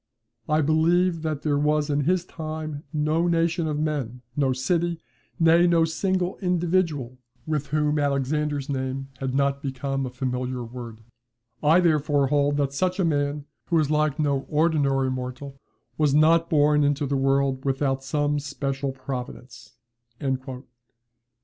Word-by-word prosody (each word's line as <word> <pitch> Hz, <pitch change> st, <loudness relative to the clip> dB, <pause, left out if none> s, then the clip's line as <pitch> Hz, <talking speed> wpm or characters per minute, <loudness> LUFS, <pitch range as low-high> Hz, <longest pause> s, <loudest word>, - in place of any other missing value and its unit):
I 155 Hz, +1 st, +3 dB
believe 165 Hz, +3 st, +2 dB
that 155 Hz, -3 st, -3 dB
there 145 Hz, -2 st, +1 dB
was 150 Hz, 0 st, +1 dB
in 145 Hz, -1 st, 0 dB
his 180 Hz, +1 st, +1 dB
time 155 Hz, -3 st, -6 dB
no 155 Hz, +2 st, +1 dB
nation 165 Hz, 0 st, +1 dB
of 150 Hz, -1 st, -2 dB
men, 140 Hz, -6 st, -3 dB
no 140 Hz, -3 st, +2 dB
city, 170 Hz, +6 st, 0 dB, 0.4 s
nay, 165 Hz, +1 st, +5 dB
no 165 Hz, -1 st, +4 dB
single 185 Hz, +2 st, -1 dB
individual, 170 Hz, -, 0 dB, 0.3 s
with 150 Hz, -2 st, -2 dB
whom 150 Hz, 0 st, +1 dB
Alexander's 145 Hz, 0 st, 0 dB
name 135 Hz, -1 st, -3 dB
had 130 Hz, -1 st, -2 dB
not 140 Hz, 0 st, +1 dB
become 135 Hz, 0 st, -3 dB
a -, -, -5 dB
familiar 125 Hz, 0 st, -3 dB
word. 115 Hz, -1 st, -9 dB, 0.6 s
I 160 Hz, +4 st, +5 dB
therefore 150 Hz, -4 st, +2 dB
hold 145 Hz, 0 st, +2 dB
that 140 Hz, -1 st, 0 dB
such 185 Hz, +5 st, -1 dB
a 185 Hz, -, +3 dB
man, 145 Hz, -2 st, -1 dB, 0.2 s
who 170 Hz, -, 0 dB
was 155 Hz, -2 st, +2 dB
like 150 Hz, -1 st, +1 dB
no 140 Hz, -3 st, 0 dB
ordinary 145 Hz, -4 st, +2 dB
mortal 130 Hz, +2 st, -6 dB, 0.4 s
was 145 Hz, -2 st, +3 dB
not 165 Hz, +2 st, +4 dB
born 150 Hz, -1 st, +4 dB
into 145 Hz, +1 st, +1 dB
the 140 Hz, 0 st, -1 dB
world 135 Hz, 0 st, +1 dB
without 135 Hz, -1 st, 0 dB
some 145 Hz, +1 st, 0 dB
special 140 Hz, -1 st, -3 dB
providence." 130 Hz, -1 st, -8 dB
145 Hz, 145 wpm, -25 LUFS, 135-160 Hz, 0.6 s, nay